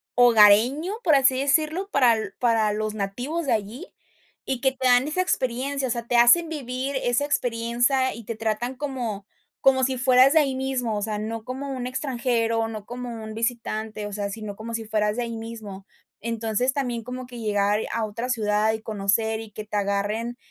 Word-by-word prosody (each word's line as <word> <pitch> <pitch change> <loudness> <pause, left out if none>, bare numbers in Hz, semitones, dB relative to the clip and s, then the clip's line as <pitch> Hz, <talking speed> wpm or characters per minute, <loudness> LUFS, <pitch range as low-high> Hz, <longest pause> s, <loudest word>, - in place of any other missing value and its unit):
hogareño, 245 - +5
por 320 -5 +5
así 265 -1 +4
decirlo, 310 +7 +1
para 240 -5 +4 0.2
para 225 -3 +2
los 215 0 -2
nativos 245 +11 -3
de - - +1
allí, 220 - -4 0.6
y 260 -2 -2
que 265 - +3
te 260 -1 -1
dan 245 +2 +4
esa 310 +5 0
experiencia. 265 -4 -1
O - - -2
sea, 235 -1 -3
te 245 - 0
hacen 240 +9 +6
vivir 270 -2 -4
esa 245 +4 +1
experiencia 245 0 +1
y 230 - -9
te 230 - -4
tratan 225 +3 -2
como 245 -8 -4 0.4
como 260 -1 +4
si 260 0 +1
fueras 255 +2 +5
de 320 - +6
ahí 275 -3 +1
mismo, 260 -4 -2
o - - -3
sea, 210 -1 -2
no 220 +1 -4
como 265 +3 -5
un 255 -2 -4
extranjero, 235 -4 -1
no 215 -2 -7
como 240 -2 -6
un 220 0 -7
visitante, 220 -2 -3
o 205 - -8
sea, 200 0 -3
sino 210 -1 -6
como 230 +2 -7
si 225 -1 -3
fueras 210 0 0
de 245 - 0
ahí 230 -1 -5
mismo. 220 -4 -8 0.3
Entonces, 230 +2 -1
también 245 -5 -2
como 250 +1 -7
que 245 -1 -9
llegar 205 -1 +1
a 225 -1 0
otra 230 +4 -5
ciudad 215 -2 +1
y 220 - -4
conocer, 220 +1 0
y 220 -1 -9
que 215 - -7
te 210 0 -3
agarren, 205 +4 -1
235 Hz, 195 wpm, -24 LUFS, 215-260 Hz, 0.6 s, hacen